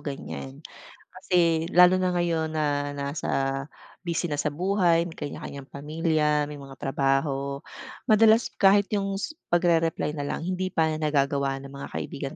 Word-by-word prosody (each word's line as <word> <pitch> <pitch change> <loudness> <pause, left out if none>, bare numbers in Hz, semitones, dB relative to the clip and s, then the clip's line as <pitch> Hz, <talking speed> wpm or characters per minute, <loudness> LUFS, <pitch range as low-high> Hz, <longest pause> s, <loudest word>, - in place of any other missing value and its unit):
ganyan. 140 0 -7 0.5
Kasi 170 -3 +1
lalo 180 +1 +7
na 185 -1 +1
ngayon 170 -2 0
na 145 -2 -1
nasa, 140 -1 -2 0.4
busy 170 0 -1
na 150 - -2
sa 150 +1 -1
buhay 175 0 +2
may 165 - -10
kanya-kanyang 140 -1 -7
pamilya, 150 0 0
may 145 - -8
mga 135 -1 -11
trabaho. 135 +1 -1 0.5
Madalas 220 +1 +5
kahit 200 0 +5
yung 195 -2 -1
s 205 - -3 0.2
pagrereply 165 -3 +2
na 145 -2 -4
lang - - -3
hindi 185 +1 -2
pa 160 -3 +1
nagagawa 140 -2 +1
ng 135 - -10
mga 140 0 -7
kaibigan 140 -1 -5
155 Hz, 145 wpm, -26 LUFS, 140-175 Hz, 0.5 s, lalo